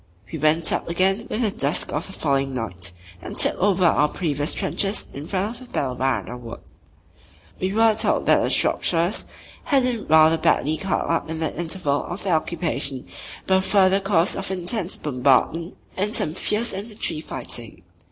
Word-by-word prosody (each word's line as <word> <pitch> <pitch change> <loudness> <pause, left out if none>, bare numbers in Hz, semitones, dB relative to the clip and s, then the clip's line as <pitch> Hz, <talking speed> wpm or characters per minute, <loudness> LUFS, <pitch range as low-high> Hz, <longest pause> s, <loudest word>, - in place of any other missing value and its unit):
We 160 - -3
"went 155 +2 +3
up" - - -2
again 190 +5 +1
with 235 - -1
the 215 - +2
dusk 140 -4 0
of 150 +4 -2
the 190 - -10
following 135 -4 0
night 90 -8 -3 0.3
and - - -8
"took - - +5
over" 190 -1 +3
our 150 -3 +4
previous 150 -3 -1
trenches 200 +1 -1
in 145 +3 -7
front 210 +6 -3
of 250 - -13
Belle 130 -3 -1
waarde 125 -1 -2
Wood. 115 -1 -9 1.0
We 185 +1 -1
were 225 +1 +4
told 215 - +1
that - - +5
the - - 0
Shropshires 170 +3 +1 0.4
had 275 -3 +3
been 245 -3 -2
rather 160 +1 +5
badly 155 0 +2
cut 195 +2 -1
up 165 -1 -1
in 160 - -3
the 160 -1 -2
interval 160 -3 -1
of 175 - -6
their 190 -3 +1
occupation 155 -5 -1 0.4
by 190 - +3
a - - +2
further 190 0 +3
course 195 -3 +1
of 195 -1 -4
intense 185 +1 -1
bombardment 145 +5 +1 0.2
and 205 +2 0
some 155 - 0
fierce 210 +6 -1
infantry 200 -5 -4
fighting. 120 - -6
170 Hz, 175 wpm, -23 LUFS, 145-195 Hz, 1.0 s, took